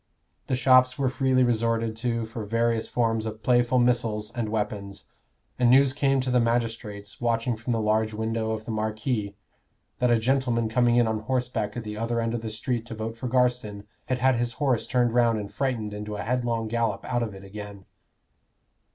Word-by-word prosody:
The 130 - +1
shops 130 0 +5
were 135 -2 +1
freely 130 0 +2
resorted 115 -1 +1
to 115 -1 -1
for 110 0 -6
various 115 +1 0
forms 115 -2 0
of 110 0 -7
playful 120 0 +3
missiles 115 -4 +1
and 115 -3 -2
weapons; 105 -2 -4 0.5
and 125 -1 +4
news 135 +1 +5
came 135 -1 +2
to 130 0 -2
the 125 - +4
magistrates, 115 -4 -2
watching 115 0 0
from 115 +2 -5
the 115 - +1
large 110 0 +1
window 110 +1 -2
of 110 0 -3
the - - -4
Marquis, 110 -1 -2 0.6
that 125 - +2
a 120 - +5
gentleman 120 -1 +1
coming 120 +1 +3
in 120 -1 +4
on 110 -1 -1
horseback 120 -2 -2
at 120 - -4
the 105 -1 -6
other 115 +1 -1
end 115 0 -1
of 120 - -2
the 115 - -4
street 115 +1 -3
to 115 - -6
vote 110 +1 -4
for 125 +2 -5
Garstin 120 -5 0 0.2
had 130 - 0
had 130 0 +3
his 120 0 -1
horse 135 -6 0
turned 120 -2 +1
round 120 -2 +3
and 105 -1 -6
frightened 115 -3 -2
into 105 0 -5
a 100 - -4
headlong 120 -2 -1
gallop 115 -3 -1
out 120 -1 -1
of 110 -4 -3
it 95 - -11
again. 100 0 -9
115 Hz, 195 wpm, -26 LUFS, 110-125 Hz, 0.6 s, shops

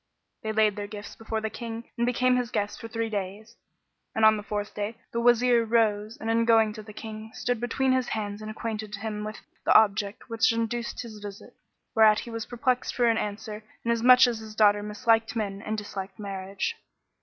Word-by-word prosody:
They 220 - -2
laid 215 -1 +3
their 205 0 -4
gifts 205 0 -8
before 220 0 -3
the 220 0 -3
King 230 -1 -6
and 235 0 0
became 250 +1 +3
his 250 -2 0
guests 205 -3 -1
for 230 - -6
three 225 0 -2
days. 205 +1 -5 0.6
And 220 - +4
on 220 0 +7
the 210 - -4
fourth 205 0 -4
day 210 +2 -3 0.2
the 235 - -1
Wazir 240 0 +4
rose 220 -1 +1
and 230 +1 +1
going 225 -1 +5
in - - -6
to 215 - -8
the 215 0 -11
King, 215 0 -8
stood 245 -1 -1
between 260 +3 +1
his 255 -1 +2
hands 205 -2 -3
and 215 - -6
acquainted 215 -1 -4
him 210 0 -4
with 215 +1 -6 0.2
the - - +3
object 205 -1 +3
which 230 -1 +3
induced 230 +1 -2
his 220 -3 -9
visit; 205 -1 -9 0.4
whereat 215 -2 +6
he 235 - -8
was 230 -1 -4
perplexed 250 +1 0
for 245 - +3
an 230 -1 +3
answer 210 +1 -5 0.2
inasmuch 235 +2 +6
as 240 -3 -1
his 220 -1 -10
daughter 205 -1 +5
misliked 225 +2 +1
men 200 -3 -2
and 215 +1 -3
disliked 195 -2 -6
marriage. 195 - -4
220 Hz, 200 wpm, -27 LUFS, 210-230 Hz, 0.6 s, on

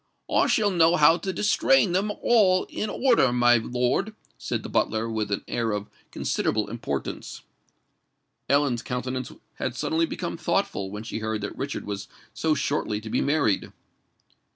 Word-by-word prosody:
"I - - +4
shall 210 -2 +2
know 170 -1 +4
how 160 +1 +6
to 190 +3 -3
distrain 175 -6 +3
'em 205 +3 +1
all 195 -6 +4
in 215 - -3
order, 235 - +3
my 120 0 +5
lord," 125 - -1 0.2
said - - -4
the - - -5
butler, 110 +1 0
with 110 -2 -2
an 100 - -2
air 115 -2 -1
of 105 0 -4 0.2
considerable 105 -1 -1
importance. 90 - -5 1.1
Ellen's 140 -4 +2
countenance 130 0 -4 0.3
had - - -2
suddenly 165 +1 0
become - - -4
thoughtful, 95 -1 -1
when 105 +2 -6
she 115 - -5
heard 110 -1 -3
that 105 - -5
Richard - - -4
was 100 0 -5 0.3
so 160 -1 +1
shortly 140 -7 -1
to 110 0 -8
be - - +1
married. 140 -8 +1
125 Hz, 155 wpm, -25 LUFS, 110-165 Hz, 1.1 s, how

